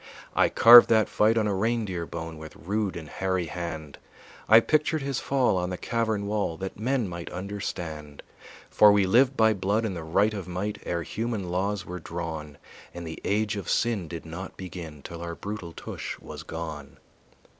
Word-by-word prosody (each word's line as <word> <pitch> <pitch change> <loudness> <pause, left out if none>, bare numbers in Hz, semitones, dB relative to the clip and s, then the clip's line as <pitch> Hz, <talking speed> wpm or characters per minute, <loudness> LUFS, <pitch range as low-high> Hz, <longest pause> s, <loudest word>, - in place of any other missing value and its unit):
I - - +4
carved 120 +1 +9
that 110 -2 +4
fight 110 +2 +2
on 110 - +2
a 105 - 0
reindeer 100 -4 -1
bone 80 -1 -6
With 80 0 -10
rude 100 0 -2
and 80 -3 -7
hairy 95 +1 -1
hand; 80 -3 -6 0.5
I 110 +1 +10
pictured 155 +4 +1
his 135 -2 -2
fall 130 -8 +1
on 90 0 -1
the 90 - -4
cavern 110 -2 -1
wall 100 -5 -1
That 95 +2 -6
men 125 0 0
might 85 -1 -7
understand. 85 -6 -6 0.5
For 105 -1 +7
we 100 -1 +4
lived 125 +7 +4
by 110 -1 +5
blood 100 +3 0
and 100 -4 -3
the 85 - -5
right 100 +7 +2
of 100 -4 -5
might 95 +4 -4
Ere 85 -1 -1
human 110 -2 -3
laws 95 +1 -1
were 90 +1 -6
drawn, 80 -3 -6 0.4
And 85 -1 -6
the 80 - -7
age 105 +1 0
of 100 - -5
sin 110 -7 +1
did 85 +1 -7
not 85 +4 -8
begin 85 -5 -8
Till 85 -1 -8
our 85 0 -5
brutal 100 -4 -6
tush - - -6
was - - -9
gone. 80 -4 -7
95 Hz, 185 wpm, -27 LUFS, 85-110 Hz, 0.5 s, I